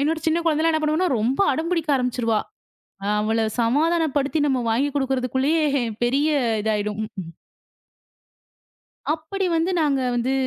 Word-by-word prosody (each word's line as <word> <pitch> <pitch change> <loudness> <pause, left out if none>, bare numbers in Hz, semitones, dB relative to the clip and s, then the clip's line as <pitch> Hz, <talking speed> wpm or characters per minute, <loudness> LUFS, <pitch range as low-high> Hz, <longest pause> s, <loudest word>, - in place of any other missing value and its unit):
என்னோட 310 +3 +1
சின்ன 320 +1 +2
குழந்தைலாம் 320 +1 +2
என்ன 315 - +1
பண்ணுவான்னா, 310 +4 +1
ரொம்ப 245 - 0
அடம் 320 +5 -2
பிடிக்க 325 -3 0
ஆரம்பிச்சிருவா. 245 -4 0 0.8
அவள 220 +2 0 0.2
சமாதானப்படுத்தி 295 +3 +1
நம்ம 265 -2 +1
வாங்கி 255 +6 +1
குடுக்கறதுக்குள்ளயே, 265 +3 0 0.4
பெரிய 275 +5 +2 0.3
இதாயிடும். 210 -1 -1
க்கும். 185 -6 -8 1.8
அப்படி 330 +5 -4
வந்து 330 +3 +1
நாங்க 285 -3 +1
வந்து 245 +2 0
275 Hz, 120 wpm, -23 LUFS, 240-320 Hz, 1.8 s, சின்ன